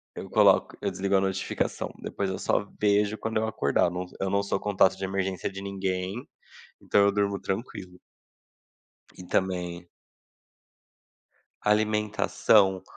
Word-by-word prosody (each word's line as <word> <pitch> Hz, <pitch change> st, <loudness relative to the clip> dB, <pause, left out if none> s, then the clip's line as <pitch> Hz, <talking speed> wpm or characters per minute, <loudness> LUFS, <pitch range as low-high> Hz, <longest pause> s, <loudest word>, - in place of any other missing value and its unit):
Eu -, -, -7 dB
coloco -, -, +4 dB
eu -, -, 0 dB
desligo 100 Hz, +1 st, 0 dB
a -, -, +4 dB
notificação, 95 Hz, -1 st, -2 dB
depois 100 Hz, -, -3 dB
eu 95 Hz, -, -3 dB
só 100 Hz, -, 0 dB
vejo 105 Hz, 0 st, +2 dB
quando 110 Hz, 0 st, -2 dB
eu 110 Hz, -, 0 dB
acordar, 70 Hz, -10 st, +1 dB
eu -, -, -1 dB
não 90 Hz, +1 st, -4 dB, 0.2 s
eu 95 Hz, -, 0 dB
não 100 Hz, +1 st, +1 dB
sou 100 Hz, -, -2 dB
contato 95 Hz, -2 st, +3 dB
de 95 Hz, 0 st, -6 dB
emergência 95 Hz, 0 st, -2 dB
de 95 Hz, 0 st, -8 dB
ninguém, 95 Hz, +3 st, -3 dB, 0.5 s
então 100 Hz, -, +3 dB
eu 100 Hz, 0 st, +4 dB
durmo 100 Hz, -1 st, 0 dB
tranquilo. 95 Hz, -3 st, -5 dB, 1.2 s
E -, -, -8 dB
também 90 Hz, -2 st, -2 dB, 1.8 s
Alimentação, 105 Hz, -2 st, +2 dB
95 Hz, 140 wpm, -27 LUFS, 95-105 Hz, 1.8 s, coloco